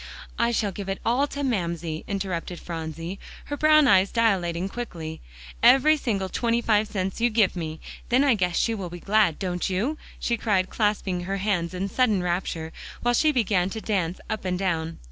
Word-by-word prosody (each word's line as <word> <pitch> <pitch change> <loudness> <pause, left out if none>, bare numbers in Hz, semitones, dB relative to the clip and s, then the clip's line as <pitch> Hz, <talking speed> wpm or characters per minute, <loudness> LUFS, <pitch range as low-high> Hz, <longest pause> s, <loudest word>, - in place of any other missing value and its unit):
"I 235 - +3
shall 220 -3 0
give 195 +1 -6
it 195 - -1
all 255 +5 +2
to 285 0 -5
Mamsie," 170 - -2
interrupted 185 -3 -3
Phronsie, 165 +2 -6 0.3
her 290 - -4
brown 305 -1 +5
eyes 195 -3 +5
dilating 190 -6 +1
quickly, 170 -8 -6 0.4
"every 300 +4 +6
single 210 -10 -1
twenty 230 +4 0
five 215 -2 +2
cents 195 0 -3
you 240 - +4
give 215 -5 +2
me. 160 -2 -4 0.3
Then 255 +3 +4
I 280 -3 +5
guess 180 -5 0
she 230 - +2
will 195 -5 -4
be 175 +1 -8
glad, 200 -4 +2
don't 180 -1 -2
you?" 225 +12 -1 0.2
she 235 - 0
cried, 195 -5 +1
clasping 200 -4 0
her 195 +1 -2
hands 185 -4 -1
in 190 +2 -2
sudden 210 -3 +2
rapture, 175 -2 -2 0.3
while 240 0 +3
she 305 +5 +4
began 200 -8 +1
to 220 - -5
dance 185 -5 -1
up 215 -1 -3
and 180 -1 -1
down. 165 -4 -1
195 Hz, 185 wpm, -25 LUFS, 175-230 Hz, 0.4 s, every